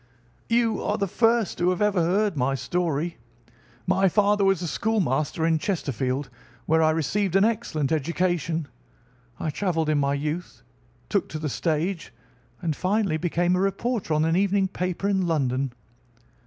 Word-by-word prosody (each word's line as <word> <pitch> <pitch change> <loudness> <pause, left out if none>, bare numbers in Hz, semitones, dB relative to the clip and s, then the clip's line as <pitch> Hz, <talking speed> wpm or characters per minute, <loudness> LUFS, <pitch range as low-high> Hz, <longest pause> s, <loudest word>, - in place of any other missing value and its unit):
"You 230 -1 +2
are 210 - -1
the 200 - 0
first 225 +1 +1
who 175 - +3
have 185 0 0
ever 210 -3 +2
heard 195 +3 +1
my 135 0 +1
story. 165 +3 -2 0.7
My 190 +1 +3
father 205 +1 +3
was 195 -2 +2
a - - -2
schoolmaster 160 - 0
in 165 -1 +2
Chesterfield, 140 - -2 0.4
where 160 +1 +3
I 155 - +4
received 175 +5 0
an 195 +1 +5
excellent 205 - -1
education. 165 0 0 0.7
I 155 - -2
travelled 165 -2 -1
in 150 -1 +2
my 140 0 +1
youth, 155 +5 -4 0.4
took 200 - 0
to 155 - -5
the 155 -1 -3
stage, 160 - -2 0.5
and 160 -3 0
finally 190 -2 0
became 175 +2 +1
a - - +1
reporter 195 -2 -1
on 155 +1 +2
an 165 +1 +2
evening 195 0 +2
paper 180 +1 -2
in 190 -3 +1
London. 135 -4 0
175 Hz, 155 wpm, -25 LUFS, 155-195 Hz, 0.7 s, an